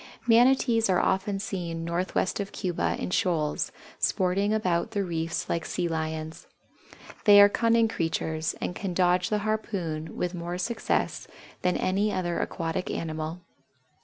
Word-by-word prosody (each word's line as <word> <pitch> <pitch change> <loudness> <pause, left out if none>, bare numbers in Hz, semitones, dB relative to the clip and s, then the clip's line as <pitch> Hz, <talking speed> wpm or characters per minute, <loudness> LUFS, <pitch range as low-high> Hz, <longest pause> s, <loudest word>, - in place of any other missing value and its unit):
Manatees 235 -1 +4
are 180 - +4
often 195 +1 +1
seen 170 -4 -4
northwest 180 +3 -1
of 200 -1 -3
Cuba 180 -2 -1
in - - -4
shoals, 160 -5 0 0.3
sporting 195 +2 +1
about 185 -6 +1
the 205 -2 -1
reefs 165 -2 -2
like 170 - -1
Sea 175 +1 -2
Lions. 160 0 -4 0.8
They 205 -1 +9
are 200 - +10
cunning 230 +1 +3
creatures 160 -4 -2
and - - -3
can 185 -1 -4
dodge 180 0 +3
the 210 - +1
harpoon 180 -8 -3
with 180 0 -1
more 175 0 -4
success 230 +6 -1 0.3
than 180 0 +1
any 200 +3 +1
other 175 -3 -1
aquatic 165 +2 -3
animal. 160 +1 -4
180 Hz, 140 wpm, -27 LUFS, 165-205 Hz, 0.8 s, are